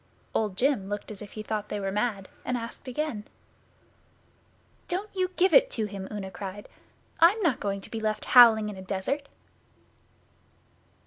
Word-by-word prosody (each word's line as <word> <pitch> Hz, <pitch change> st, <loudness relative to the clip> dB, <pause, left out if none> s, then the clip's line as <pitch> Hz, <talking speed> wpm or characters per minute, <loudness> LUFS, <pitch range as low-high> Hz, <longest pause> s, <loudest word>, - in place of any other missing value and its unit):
Old 210 Hz, -4 st, -1 dB
Jim 250 Hz, -8 st, +1 dB
looked 205 Hz, +1 st, -4 dB
as 205 Hz, -, -9 dB
if 205 Hz, -, -10 dB
he 215 Hz, -, -6 dB
thought 210 Hz, -1 st, -3 dB
they 210 Hz, -, -3 dB
were 195 Hz, -1 st, -2 dB
mad, 205 Hz, -2 st, -1 dB, 0.2 s
and 250 Hz, -, -1 dB
asked 230 Hz, +3 st, -8 dB
again. 255 Hz, -4 st, -3 dB, 1.6 s
'Don't 390 Hz, +3 st, -3 dB
you 370 Hz, -1 st, +1 dB
give 375 Hz, +1 st, +3 dB
it -, -, +6 dB
him,' 200 Hz, -4 st, -3 dB
Una 200 Hz, -3 st, -5 dB
cried. 195 Hz, +2 st, -7 dB, 0.5 s
'I'm 350 Hz, +7 st, +6 dB
not 275 Hz, -7 st, +2 dB
going 200 Hz, -1 st, -2 dB
to -, -, -12 dB
be 225 Hz, -, -3 dB
left 215 Hz, -1 st, -2 dB
howling 225 Hz, -4 st, +8 dB
in 210 Hz, -, -5 dB
a -, -, -8 dB
desert. 200 Hz, +10 st, -3 dB
215 Hz, 165 wpm, -27 LUFS, 200-270 Hz, 1.6 s, howling